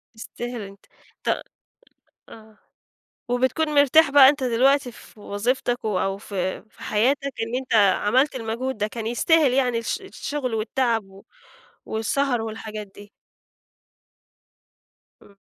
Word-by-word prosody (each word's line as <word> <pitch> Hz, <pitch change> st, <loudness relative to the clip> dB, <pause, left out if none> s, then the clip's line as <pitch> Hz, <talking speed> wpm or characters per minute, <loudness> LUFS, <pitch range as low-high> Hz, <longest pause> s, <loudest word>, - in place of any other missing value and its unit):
يستاهل 240 Hz, +1 st, -7 dB
أنت، 200 Hz, 0 st, -12 dB, 0.4 s
ت -, -, 0 dB, 0.9 s
آه، 220 Hz, -1 st, -15 dB, 0.7 s
وبتكون 260 Hz, +6 st, 0 dB
مرتاح 285 Hz, +1 st, +5 dB
بقى 275 Hz, -2 st, +9 dB
أنت 285 Hz, -2 st, -1 dB
دلوقتي 255 Hz, +2 st, +2 dB
في 220 Hz, -, -17 dB
وظيفتَك 240 Hz, +4 st, -2 dB
و 205 Hz, -4 st, 0 dB
أو 195 Hz, 0 st, -1 dB
في 190 Hz, -3 st, -4 dB
في -, -, -21 dB
حياتَك 255 Hz, +7 st, +1 dB, 0.2 s
إن 225 Hz, +2 st, -3 dB
أنت 255 Hz, -2 st, -3 dB, 0.2 s
عملت 260 Hz, +7 st, +2 dB
المجهود 240 Hz, +2 st, -3 dB
ده، 210 Hz, 0 st, -1 dB
كان 225 Hz, 0 st, -6 dB
يستاهل 280 Hz, +3 st, +3 dB
يعني 250 Hz, -3 st, +1 dB
الش 230 Hz, -, -3 dB
الشُغل 290 Hz, -9 st, -5 dB
والتعب 225 Hz, 0 st, 0 dB
و 195 Hz, 0 st, -17 dB, 0.6 s
والسهر 245 Hz, +2 st, -1 dB
والحاجات 215 Hz, -1 st, -6 dB
دي. 205 Hz, +1 st, -15 dB, 2.1 s
إمم، 200 Hz, -, -20 dB
235 Hz, 125 wpm, -23 LUFS, 215-265 Hz, 2.1 s, بقى